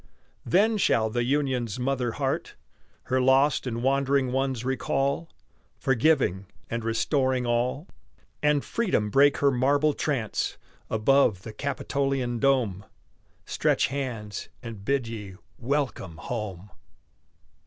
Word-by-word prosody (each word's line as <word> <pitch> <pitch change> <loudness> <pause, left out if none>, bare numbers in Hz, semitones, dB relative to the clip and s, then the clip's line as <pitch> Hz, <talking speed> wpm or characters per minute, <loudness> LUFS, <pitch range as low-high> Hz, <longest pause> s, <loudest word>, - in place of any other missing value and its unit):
Then 215 +4 +3
shall 110 - +2
the 120 +1 0
Union's 130 -4 0
mother 125 -2 -1
heart - - -2 0.5
Her 130 0 0
lost 135 +2 +3
and 120 -1 -3
wandering 135 -1 +2
ones 130 -2 -1
recall, 135 +4 -1 0.5
Forgiving 125 - +2 0.2
and 115 0 -2
restoring 130 +2 +1
all, 125 +7 0 0.5
And 150 -1 +2
Freedom 180 - 0
break 140 +3 +5
her 140 -1 +3
marble 140 +4 +2
trance 130 -9 -2 0.3
Above 110 -3 +3
the 110 - -8
Capitolian 135 -3 -2
dome, 120 -8 +1 0.6
Stretch - - +1
hands, 115 -7 -4
and 115 -4 -8
bid 135 0 0
ye 105 -4 -7 0.2
welcome 125 - -2
home! 100 -2 -5
130 Hz, 110 wpm, -26 LUFS, 115-140 Hz, 0.6 s, break